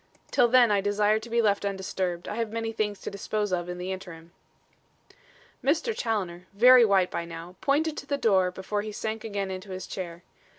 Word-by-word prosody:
Till - - +4
then 240 -2 +5
I 200 -1 +3
desire 205 +1 +2
to 230 +2 -10
be 235 0 +2
left 205 -2 +2
undisturbed. 190 -3 -3
I 210 - -4
have 230 -2 -2
many 225 0 -2
things 210 -2 -2
to - - -5
dispose 205 0 -2
of 175 -1 -1
in 180 - -5
the 180 +1 -4
interim." 170 -3 -8 1.3
Mr. 330 - +1
Challoner, 185 -6 -3
very 245 +4 +8
white 195 -4 +3
by 170 - -2
now, 170 +1 -9
pointed 300 +3 +1
to 280 - -7
the 280 - 0
door 190 -8 +3
before 190 +3 -3
he 215 +1 -6
sank 220 +1 -4
again 200 -3 -3
into 185 +1 -7
his 185 -1 -5
chair. 175 -2 -7
205 Hz, 200 wpm, -27 LUFS, 185-225 Hz, 1.3 s, very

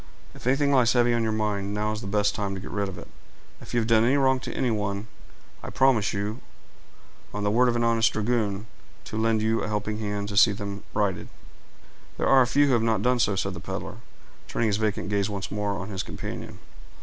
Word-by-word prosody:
"If - - -9
anything 140 +2 +3
lies 125 -4 +4
heavy 120 -1 +3
on 120 - +1
your 110 -1 0
mind, 105 -2 -1
now 105 +1 0
is 110 0 -4
the 100 - -6
best 105 0 +1
time 100 -2 -3
to - - -5
get 95 - -8
rid 100 -1 -1
of 95 - -8
it—if - - -16
you 120 - +2
have - - -1
done 110 -1 +4
any 130 +4 +3
wrong 130 -1 +3
to - - -6
anyone, 105 -5 -1 0.6
I - - -7
promise 130 -6 +3
you, 105 +3 -3 0.9
on 105 - -2
the 105 - +1
word 125 +3 +4
of 120 - 0
an 120 - +1
honest 115 -2 +3
dragoon, 105 -2 -1 0.4
to - - -8
lend 110 0 +1
you 110 +1 +1
a - - -2
helping 105 0 -2
hand 105 -1 -3
to 100 - -4
see 105 +1 +7
them 100 -1 -6
righted." 100 -4 0 0.9
"There - - -1
are 135 -1 +6
few 145 +4 +4
who 135 - +2
have 120 - +3
not 110 -3 +1
done 125 0 +2
so," 105 -3 +2
said 95 0 -1
the 85 - -7
peddler, 85 - -6 0.5
turning 115 -2 0
his 100 - +1
vacant 105 -2 -1
gaze 100 0 0
once 100 -2 -5
more 105 0 -1
on 100 0 -5
his 95 -2 -3
companion. - - -7
105 Hz, 225 wpm, -26 LUFS, 100-115 Hz, 0.9 s, see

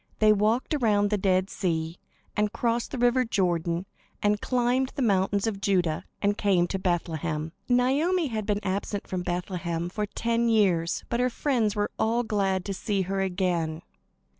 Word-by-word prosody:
They 215 -1 +5
walked 215 +7 +1
around 210 -7 +2
the 210 - +2
Dead 185 -1 +2
Sea, 165 -2 -2 0.4
and 210 0 +1
crossed 235 +1 -1
the 270 - -5
river 245 +1 +3
Jordan, 175 -5 0 0.3
and 210 0 +1
climbed 250 +1 +1
the 270 - 0
mountains 200 -1 +2
of 205 -3 -2
Judah, 180 -5 +1 0.2
and 205 0 +2
came 190 -4 +3
to 195 - -2
Bethlehem. 165 -3 -2 0.2
Naomi 285 +9 +2
had 215 -3 -3
been 205 -1 0
absent 200 +1 -2
from 185 -1 -3
Bethlehem 175 -1 -3
for 210 +2 -3
ten 230 +2 0
years, 185 -7 +2
but 235 - 0
her 250 0 +2
friends 235 -5 0
were 205 0 -1
all 230 +2 +2
glad 195 -4 0
to 200 - -2
see 195 0 -1
her 195 +1 -2
again. 180 -4 -1
200 Hz, 165 wpm, -27 LUFS, 180-230 Hz, 0.4 s, They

